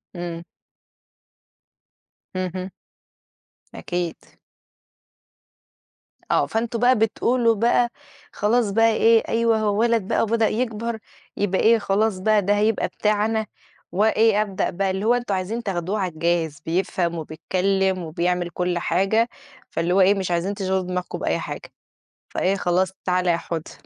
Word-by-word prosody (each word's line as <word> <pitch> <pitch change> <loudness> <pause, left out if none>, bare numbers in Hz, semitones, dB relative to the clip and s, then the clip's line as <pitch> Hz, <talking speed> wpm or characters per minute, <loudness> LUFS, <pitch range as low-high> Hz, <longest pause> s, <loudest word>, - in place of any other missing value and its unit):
إمم. 170 -1 -5 1.9
اهم. 185 0 -3 1.0
أكيد. 175 -2 -3 2.2
آه، - - +3
فأنتم 230 +1 -2
بقى 250 +2 +5
بتقولوا 230 +1 +2
بقى، 240 +2 +2 0.4
خلاص 220 0 +1
بقى 225 +3 +4
إيه 225 +1 +4
أيوه 230 0 +2
هو 210 -1 0
وَلَد 230 -4 +2
بقى - - +1
وبدأ 225 0 +2
يكَبر 230 -1 -2 0.4
يبقى 195 -2 0
إيه 230 +1 +5
خلاص 200 0 0
بقى 215 +2 +3
ده 205 +2 +2
هيبقى 215 +1 +1
بتاعنا، 215 +1 0 0.5
وإيه 215 +1 +3
أبدأ 200 -3 -1
بقى 190 +2 -1
اللي 190 +2 -3
هو 235 - +4
أنتم 245 -4 -1
عايزين 205 +6 -3
تاخدوه 195 +1 -2
على 185 -2 -1
الجاهز 160 -2 -1
بيفْهم 175 0 -1
وبيتكلم 185 +4 0
وبيعمل 175 +2 -1
كُلّ 180 0 -1
حاجة، 195 +7 +1 0.4
فاللي 170 +2 -1
هو 195 - +4
إيه 190 +2 +6
مش 190 -2 -3
عايزين 175 +3 0
تشغِلوا 190 -2 -1
دماغكم 180 0 -4
بأي - - 0
حاجة. - - -7 0.6
فإيه 190 +2 0
خلاص 185 0 +1
تعال 180 0 +1
يا 170 -1 +3
حوده. 165 -1 -5
195 Hz, 135 wpm, -23 LUFS, 180-220 Hz, 2.2 s, إيه